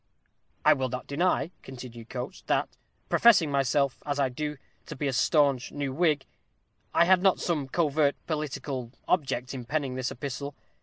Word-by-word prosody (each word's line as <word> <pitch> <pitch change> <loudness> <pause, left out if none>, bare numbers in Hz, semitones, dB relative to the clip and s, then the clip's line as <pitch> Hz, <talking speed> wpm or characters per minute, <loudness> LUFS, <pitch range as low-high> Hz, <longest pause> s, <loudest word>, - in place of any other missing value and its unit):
I - - +8
will 130 -1 -1
not 125 +1 -5
deny," 170 +3 +1
continued 120 -3 -10
Coates, 130 +8 -6
"that, - - +1 0.4
professing 195 -10 +5
myself, 140 0 +1
as 145 -1 -2
I 135 -2 +2
do, 150 +3 -4 0.3
to - - -6
be 145 +2 -2
a 135 - 0
staunch 140 -1 +2
new 140 -2 -3
Whig, 150 -3 +2 0.7
I - - +5
had 185 0 +5
not 190 -1 +4
some 150 -6 -1
covert 150 -1 +2
political 145 -5 -3 0.2
object 135 -7 0
in 130 -2 -5
penning 140 +1 -2
this 130 0 -2
epistle. 140 +2 -5
140 Hz, 160 wpm, -28 LUFS, 130-155 Hz, 0.7 s, I